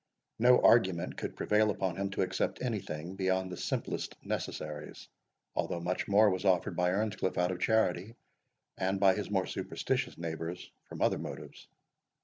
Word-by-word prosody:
No 125 +2 +6
argument 95 -7 +4
could - - -5
prevail 105 0 +2
upon 95 -3 -1
him 100 +1 -2
to 95 - 0
accept 95 0 -1
anything 95 -7 -3
beyond 95 -1 0
the - - -4
simplest - - -3
necessaries, 75 -1 -5 0.5
although 85 - -1
much 90 +2 -2
more 105 +1 +5
was 95 0 -2
offered 95 -3 +2
by 90 0 +2
Earnscliff 100 0 -1
out 90 +1 +2
of 90 - -4
charity, 110 0 +1 0.6
and 95 +1 0
by 95 -1 +6
his 105 +1 -4
more 95 -2 +1
superstitious - - -2
neighbours 85 +1 -5 0.2
from - - -3
other - - +2
motives. - - -8
95 Hz, 155 wpm, -31 LUFS, 90-105 Hz, 0.6 s, No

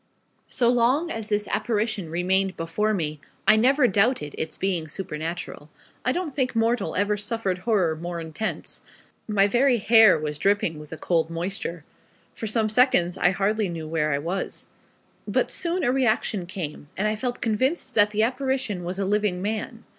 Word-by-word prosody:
So 240 - +1
long 250 +8 +2
as 225 -1 -5
this 210 -1 0
apparition 215 -6 -1
remained 185 +3 0
before 190 +6 -1
me, 155 -7 -2 0.3
I 215 - +8
never 255 +4 +4
doubted 200 - +1
its 160 - -4
being 180 -5 0
supernatural. 160 -1 -6 0.3
I 250 - +2
don't 335 -3 -3
think 260 -3 0
mortal 230 +2 +1
ever 205 +1 +1
suffered 205 -3 -2
horror 185 -6 +1
more 170 +1 -5
intense. 165 +7 -5 0.5
My 205 -2 +3
very 245 +3 +3
hair 220 -3 +6
was 150 -1 -4
dripping 195 -5 +1
with 150 -1 -12
a 160 - -6
cold 165 -1 0
moisture. 170 -1 -4 0.5
For 225 - -5
some 220 0 +1
seconds 215 -6 +3
I 175 - +3
hardly 200 +2 0
knew 165 -2 -5
where 155 -1 0
I 140 - +1
was. 170 +6 -4 0.6
But - - 0
soon 350 +1 -1
a 245 - +3
reaction 220 -7 0
came, 155 -5 -6
and 210 +3 +1
I 215 - 0
felt 245 +2 -3
convinced 260 +5 0
that 210 -2 +5
the 215 +1 +1
apparition 255 -6 -1
was 180 +2 -4
a 195 - -1
living 205 -2 +1
man. 220 +4 -4
205 Hz, 170 wpm, -25 LUFS, 175-230 Hz, 0.6 s, I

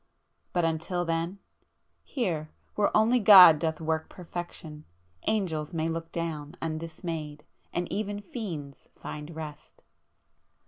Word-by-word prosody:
But, 175 -2 +1
until 165 +2 -1
then,... 165 +3 -1 0.7
here, 170 - -2 0.2
where 205 -1 +2
only 230 +3 +4
God 190 -7 +10
doth 160 -1 -1
work 160 0 -2
perfection, 170 -3 -8 0.4
angels 170 -7 -1
may 160 0 0
look 165 0 -4
down 160 -2 -4
undismayed, 155 -1 -5 0.3
and 175 0 -2
even 205 0 -2
fiends 175 - -7
find 150 +2 -8
rest!" 150 -2 -9
165 Hz, 110 wpm, -28 LUFS, 155-180 Hz, 0.7 s, God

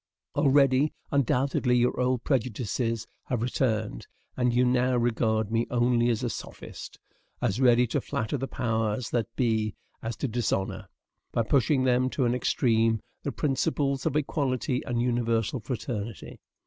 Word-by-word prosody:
Already, 140 0 +4 0.2
undoubtedly, 130 -2 +2
your 125 +1 +1
old 125 -1 +1
prejudices 115 -2 -1 0.2
have 120 -3 -1
returned, 110 - -1 0.3
and 125 -1 +2
you 125 +1 +3
now 125 0 +2
regard 110 -2 +1
me 115 +1 +1
only 120 0 +2
as 115 -3 0
a - - +1
sophist, - - -8 0.4
as 110 +8 0
ready 125 -1 +5
to 115 - -1
flatter 110 +5 -2
the 135 0 -2
powers 115 -1 -1
that 115 -3 0
be 110 -4 0 0.3
as 115 0 -4
to 135 - -2
dishonor, 110 -5 -2 0.4
by 115 - +1
pushing 130 +2 +2
them 130 0 +3
to 130 -1 0
an 120 - +2
extreme, 115 -3 +2 0.2
the 140 - -3
principles 140 -1 0
of - - -1
equality 135 -3 0
and 120 -2 0
universal 120 -1 0
fraternity. 115 - -5
120 Hz, 145 wpm, -27 LUFS, 115-130 Hz, 0.4 s, ready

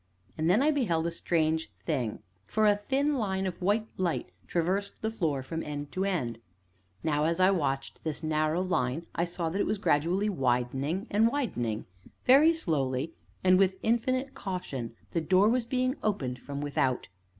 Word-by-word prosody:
And 160 +1 0
then 215 +9 +4
I 305 - +4
beheld 180 - +1
a 170 - 0
strange 160 -1 0
thing, 125 -10 -2 0.2
for 215 0 +2
a 205 -1 +6
thin 275 +7 0
line 190 -3 -1
of 185 -1 -4
white 210 +4 +1
light 180 -3 -1 0.2
traversed 185 +4 -1
the 220 - 0
floor 155 -11 -1
from 160 +5 -4
end 145 -1 -5
to 190 +1 -1
end. 125 - -1 0.6
Now, 150 -1 +1
as 165 +2 +1
I 185 +1 +6
watched 135 -7 -2
this 155 0 -3
narrow 155 +2 +1
line, 160 -4 0
I 170 - +1
saw 170 -1 -2
that 195 +5 -1
it - - 0
was 210 - 0
gradually 180 +3 +2
widening 135 +2 0
and 215 +3 +4
widening; 120 - -2 0.4
very 285 +6 +7
slowly, 150 - -1 0.3
and 185 0 +5
with 190 -1 +3
infinite 255 +4 +1
caution, 140 -12 -5 0.2
the 170 - 0
door 185 +5 +4
was 240 +1 +2
being 255 +1 +1
opened 135 -13 -1
from 140 +2 -6
without. 135 -3 0
175 Hz, 170 wpm, -29 LUFS, 145-205 Hz, 0.6 s, very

